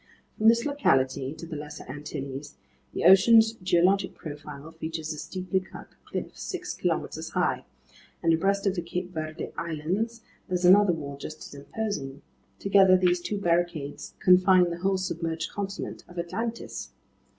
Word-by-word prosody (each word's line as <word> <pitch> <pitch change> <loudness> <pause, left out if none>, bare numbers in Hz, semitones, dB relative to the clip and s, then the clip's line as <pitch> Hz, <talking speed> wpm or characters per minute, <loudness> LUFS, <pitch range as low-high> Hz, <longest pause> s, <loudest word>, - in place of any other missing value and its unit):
From 215 - +2
this 235 +1 +5
locality 135 - +1
to 165 - -9
the 165 -1 -7
Lesser 150 0 -7
Antilles, 145 0 -6 0.3
the - - -3
ocean's 220 +4 +7
geologic 185 -1 +2
profile 150 0 -9
features 160 -1 -5
a - - -9
steeply 185 +4 -2
cut 185 - -12 0.2
cliff - - -5
six - - -5
kilometers - - -2
high, - - 0 0.6
and 165 -1 +4
abreast 195 +5 +1
of 195 - +2
the 180 - -2
Cape 180 +2 -5
Verde 155 0 -5
Islands, 180 +9 -2 0.3
there's 180 0 0
another 195 +1 +7
wall 145 -4 -5
just 155 +2 -8
as - - -11
imposing; 140 -3 -5 0.3
together 195 -1 +5
these 180 -1 +2
two 205 +4 -3
barricades 170 -5 -1
confine 180 -1 +5
the 170 - -5
whole 190 +1 +1
submerged 165 -3 -3
continent 200 -1 -5
of 175 - -14
Atlantis. 225 +7 -4
175 Hz, 150 wpm, -27 LUFS, 155-195 Hz, 0.6 s, ocean's